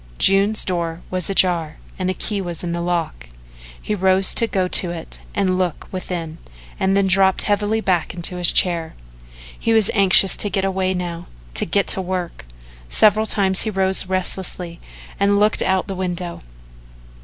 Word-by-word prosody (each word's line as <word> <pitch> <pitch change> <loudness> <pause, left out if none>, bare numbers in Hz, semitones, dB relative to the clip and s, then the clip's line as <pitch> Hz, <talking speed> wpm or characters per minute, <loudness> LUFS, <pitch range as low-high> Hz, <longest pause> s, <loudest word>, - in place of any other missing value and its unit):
June's 200 +3 +4
door 170 -2 -4
was 185 -1 -2
ajar 175 -5 +1 0.2
and 185 0 -2
the 185 - -2
key 205 0 -2
was 175 -2 -6
in 175 - -4
the 170 0 -3
lock. 165 - -4 0.5
He - - -4
rose 190 -1 +3
to 230 - +3
go 190 -4 -1
to 180 0 +5
it 170 -2 -8 0.2
and 185 -2 0
look 180 -4 -3
within 170 -3 -6 0.4
and 190 +1 +1
then 200 - +2
dropped 190 0 +3
heavily 210 +1 -1
back 180 -5 -1
into 180 +1 -2
his 175 -1 +2
chair. 170 -3 0 0.6
He 230 - 0
was 220 -3 +2
anxious 195 -2 +4
to 205 - 0
get 195 -1 -2
away 190 -1 -1
now 175 -2 -6 0.3
to - - -1
get 200 +4 +1
to 190 - +2
work. 180 - -6 0.4
Several 215 - +5
times 190 -2 +3
he 220 - -1
rose 190 -2 +2
restlessly 185 -2 -3 0.4
and 200 0 +2
looked 210 +1 +1
out 190 0 0
the 195 - -5
window. 180 -2 -5
185 Hz, 170 wpm, -19 LUFS, 175-195 Hz, 0.6 s, to